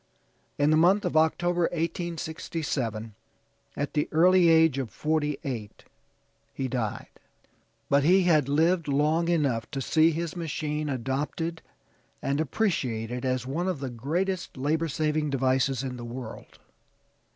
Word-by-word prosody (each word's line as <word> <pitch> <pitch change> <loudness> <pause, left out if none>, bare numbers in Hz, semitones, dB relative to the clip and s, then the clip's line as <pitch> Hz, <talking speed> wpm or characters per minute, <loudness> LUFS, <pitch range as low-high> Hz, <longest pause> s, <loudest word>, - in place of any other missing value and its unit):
In 145 +1 +3
the 155 - +5
month 185 +5 +4
of 175 - -2
October, 175 +2 +2
1867, 160 - -3 0.6
at 145 +1 -2
the 150 - 0
early 175 +2 +5
age 160 -4 +5
of 130 -4 -3
forty 150 0 -1
eight 115 -7 -6 0.7
he 135 - -2
died. 120 -4 -3 0.8
But 140 0 +3
he 185 +5 +5
had 155 -6 +3
lived 165 +3 +2
long 150 +4 +2
enough 140 -10 0
to 135 - -4
see 160 +4 +3
his 165 0 -3
machine 150 -2 -3
adopted 145 +6 -3 0.6
and 140 +2 -1
appreciated 125 - -1
as 130 -1 -1
one 160 +8 -2
of 180 -6 -1
the 135 -2 -4
greatest 170 +9 -2
labor 155 +5 0
saving 155 0 0
devices 135 -1 +1
in 130 -2 -4
the 120 - -7
world. 120 -1 -8
150 Hz, 135 wpm, -27 LUFS, 130-165 Hz, 0.8 s, the